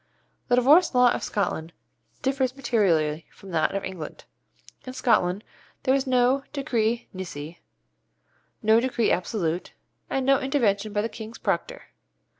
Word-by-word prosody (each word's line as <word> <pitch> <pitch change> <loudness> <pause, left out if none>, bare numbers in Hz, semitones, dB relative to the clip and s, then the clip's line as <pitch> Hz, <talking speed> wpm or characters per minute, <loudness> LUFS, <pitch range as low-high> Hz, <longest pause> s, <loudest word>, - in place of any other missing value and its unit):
The 245 - +4
Divorce 285 +6 +5
Law 250 -1 +6
of - - -2
Scotland 170 -5 -2 0.5
differs 265 -1 0
materially 170 - +1
from 195 - -13
that 160 +2 +1
of 195 - -2
England. 175 -5 -7 0.6
In 255 - -5
Scotland 210 -6 +1 0.4
there 260 - +3
is 275 0 +1
no 255 +2 +3
decree 235 -4 0
nisi, 170 -3 -7 1.0
no 220 +1 +5
decree 240 -2 +1
absolute, 175 -2 -1 0.4
and 265 -1 -1
no 275 0 +4
intervention 225 -7 0
by 205 0 0
the - - 0
King's 225 0 -9
Proctor. - - -3
225 Hz, 135 wpm, -25 LUFS, 185-260 Hz, 1.0 s, Law